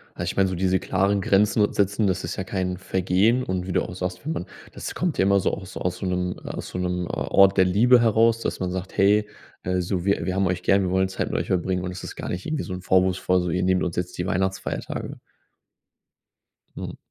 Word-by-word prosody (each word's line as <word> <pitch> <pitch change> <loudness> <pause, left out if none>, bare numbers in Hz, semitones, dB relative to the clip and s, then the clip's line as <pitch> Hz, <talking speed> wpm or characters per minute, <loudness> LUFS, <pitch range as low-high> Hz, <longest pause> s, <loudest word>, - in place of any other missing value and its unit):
Also, - - -4
ich - - -13
meine, 95 -1 +4
so 95 - -3
diese 95 +1 +1
klaren 100 +2 +1
Grenzen 105 +2 +3
setzen, 100 +1 +1
das 90 -1 -1
ist - - -4
ja 95 - -2
kein 95 -1 -2
Vergehen 95 +6 +1
und 95 -4 -3
wie 95 - -3
du - - +2
auch - - -7
sagst, 90 +2 -5
wenn 155 - -2
man 90 - -4 0.3
das - - -7
kommt 175 -4 -1
ja - - +3
immer 100 0 +4
so - - 0
aus 95 -1 -7
aus 90 0 -2
so 95 - -5
'nem 90 0 -1 0.2
so - - -6
'nem 90 -1 -2
Ort 100 0 +3
der 95 - +6
Liebe 120 +7 +5
heraus, 115 0 +3
dass - - -3
man 90 -1 -2
sagt: 95 0 -6
„Hey, 105 +2 +4 0.4
äh, 90 0 0
so 90 0 -2
wir 100 0 +1
wir 95 - -1
haben 95 0 +1
euch 90 -1 -2
gern, 100 0 +4
wir 95 - 0
wollen 95 +1 +1
Zeit 95 - -3
mit - - -1
euch - - -3
verbringen 90 0 0
und 90 - -3
das 90 - -8
ist - - -7
gar - - -6
nicht 90 +1 -4
irgendwie 155 -1 -2
so 95 - -6
'n 90 - -6
vorwurfsvoll 95 0 +2
so, 90 - -2
ihr 90 - 0
nehmt 95 0 +2
uns 85 -2 -2
jetzt 90 0 -3
die 90 - -2
Weihnachtsfeiertage.” 95 +1 -3 1.6
Mhm. - - -6
95 Hz, 240 wpm, -24 LUFS, 90-100 Hz, 1.6 s, der